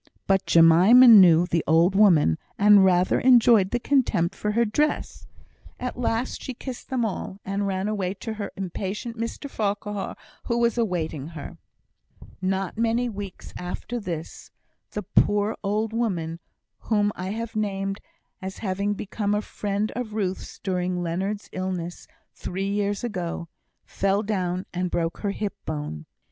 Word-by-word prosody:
But 195 -1 +1
Jemima 175 +10 +7
knew 180 -7 +8
the 170 -2 0
old 165 +4 +4
woman, 175 - +4 0.2
and 205 -1 +7
rather 180 -1 +3
enjoyed 235 -6 +5
the 240 - -1
contempt 230 -10 +1
for 210 +1 -2
her 235 +2 +3
dress. 295 +8 -1 0.5
At 250 - -4
last 240 0 -2
she 260 - -6
kissed 255 0 -8
them 255 -3 0
all, 195 -1 -5
and 200 +1 -1
ran 190 0 -1
away 200 -3 -2
to 220 +3 -5
her 210 -2 -5
impatient 195 +4 -4
Mr 230 +5 -5
Farquhar, 205 -4 -3 0.3
who 235 - 0
was 235 -1 +2
awaiting 170 - -2
her. 160 -4 -9 0.8
Not 190 +2 -2
many 235 +2 +1
weeks 200 -3 -8
after 180 +7 -5
this, 170 -6 -6 0.4
the 210 - -5
poor 205 +2 +2
old 210 +2 -1
woman 175 -8 -2 0.4
whom 210 -2 +1
I 185 +1 -5
have 225 +2 -5
named 195 -2 -2 0.4
as 190 0 -6
having 200 0 -1
become 205 +1 -2
a 210 - 0
friend 205 +1 -2
of 230 -3 -4
Ruth's, 190 -3 -3
during 180 -2 -2
Leonard's 190 +5 -3
illness 185 -2 -4 0.3
three 190 +2 -4
years 205 +1 -1
ago, 175 -6 -4 0.4
fell 195 +2 0
down 185 -3 -2
and 180 0 -1
broke 165 0 -2
her 205 - -2
hip 200 0 -3
bone. 150 - -5
200 Hz, 150 wpm, -25 LUFS, 180-220 Hz, 0.8 s, knew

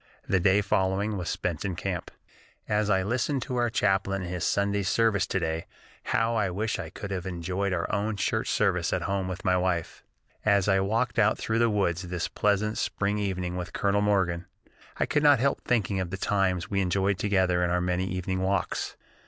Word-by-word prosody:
The 95 - +2
day 95 +3 +4
following 100 +1 0
was 90 -4 -3
spent 85 -4 -2
in 95 -3 -2
camp: 90 -1 -3 0.6
"As 105 0 +1
I 95 -2 +3
listened 125 +5 0
to 125 - -4
our 120 -1 +2
chaplain 95 -2 +1
in 90 - -5
his 90 -2 -3
Sunday 100 0 +1
service 100 0 +2
to 95 - 0
day, 80 -1 -2 0.4
how 115 +1 +1
I 100 -4 +1
wished 105 +5 -2
I - - -5
could 100 - -7
have 95 -1 -3
enjoyed 95 +2 -2
our 85 -2 0
own 105 +1 0
church - - 0
service - - +1
at - - -1
home 100 -1 -1
with 95 +2 -6
my 90 -1 +3
wife. 90 -2 -1 0.4
As 100 -2 +3
I 95 -1 +4
walked 110 +4 0
out 110 0 +4
through 110 0 -1
the 120 0 +4
woods 95 -5 0
this 90 -2 -3
pleasant 105 +1 0
spring 105 +1 -1
evening 90 -3 -2
with 90 -1 -5
Colonel 100 0 +1
Morgan, 95 -4 +1 0.5
I - - +1
could 150 - +1
not 145 -2 +6
help 140 +2 +1
thinking 105 -5 0
of 90 -2 -2
the 95 - -4
times 95 -3 0
we 100 -1 0
enjoyed 95 +1 +1
together 95 -3 +2
in 90 - +1
our 90 +1 +1
many 90 +1 0
evening 95 0 -2
walks. 95 0 -1
95 Hz, 200 wpm, -27 LUFS, 90-105 Hz, 0.6 s, not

